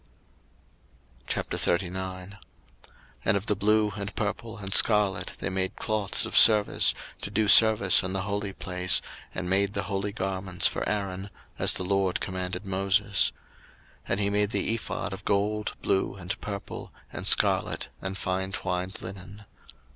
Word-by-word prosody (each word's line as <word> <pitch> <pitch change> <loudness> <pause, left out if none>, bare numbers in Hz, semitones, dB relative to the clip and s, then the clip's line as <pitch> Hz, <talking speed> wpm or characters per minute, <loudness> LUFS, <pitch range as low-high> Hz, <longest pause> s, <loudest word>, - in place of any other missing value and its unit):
02:039:001 95 +2 -3 0.8
And - - +2
of 100 - -6
the 105 - 0
blue, 105 +1 +1
and 100 0 -6
purple, 110 +2 -4
and 95 -2 -6
scarlet, 105 -3 +4
they - - -3
made 95 0 -2
cloths 105 -3 -1
of - - -6
service, 105 -2 +6 0.3
to - - -4
do 110 0 0
service 110 -3 +6
in 95 -1 -4
the 95 -1 -3
holy 100 -1 -3
place, 90 -1 0 0.4
and 90 -1 -3
made 100 +2 +1
the - - -2
holy 100 0 -3
garments 95 -1 -3
for - - -4
Aaron; 100 -1 -4 0.3
as - - +5
the 95 - -3
LORD 95 0 0
commanded 95 0 -5
Moses. 95 0 +1 0.8
02:039:002 - - -15
And 100 - 0
he 100 - +1
made 105 0 +1
the 110 - -1
ephod 115 -3 -4
of 95 +1 -9
gold, 105 +2 -1
blue, 95 0 0
and 95 -1 -6
purple, 100 -1 -7 0.2
and - - -3
scarlet, - - +3
and 95 0 -5
fine 95 +1 -3
twined 95 -1 -4
linen. 95 +3 -10
95 Hz, 150 wpm, -26 LUFS, 95-105 Hz, 0.8 s, service